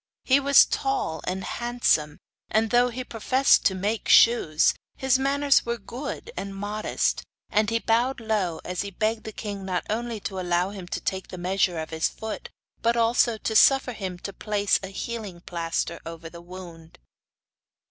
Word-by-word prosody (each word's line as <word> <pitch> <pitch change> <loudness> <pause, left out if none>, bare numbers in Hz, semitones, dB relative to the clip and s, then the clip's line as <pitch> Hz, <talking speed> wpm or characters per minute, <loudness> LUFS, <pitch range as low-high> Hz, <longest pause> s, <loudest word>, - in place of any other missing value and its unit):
He 270 +1 +4
was 280 0 +7
tall 270 -12 -2
and 185 +1 -2
handsome 240 -11 0 0.3
and, 220 +1 +1
though 245 0 +4
he 255 +2 -5
professed 255 +4 +3
to 190 - +3
make 205 +4 -2
shoes, 195 -10 +5 0.2
his 265 -1 +2
manners 280 +1 +3
were 235 0 -2
good 255 - -7
and 195 0 -5
modest, 205 +2 -1 0.3
and 210 0 +2
he 230 - +1
bowed 235 +4 +1
low 210 -7 -1
as 180 -1 -2
he 200 - -4
begged 215 +3 -2
the 220 - -5
king 205 -2 -6
not 185 -2 -2
only 230 0 -2
to 190 -1 -4
allow 180 +1 0
him 190 -3 -8
to - - -3
take 190 -1 -3
the 185 - -8
measure 180 0 0
of 160 0 -5
his 160 0 0
foot, 220 0 -7 0.3
but 235 +1 +2
also 235 0 +3
to 220 +1 -3
suffer 270 +2 +5
him 190 -5 -5
to 200 +2 -7
place 205 0 +1
a 195 - -6
healing 200 -2 -6
plaster 170 -1 -3
over 165 0 -8
the 170 - -11
wound. 170 -2 -11
210 Hz, 175 wpm, -25 LUFS, 180-235 Hz, 0.3 s, was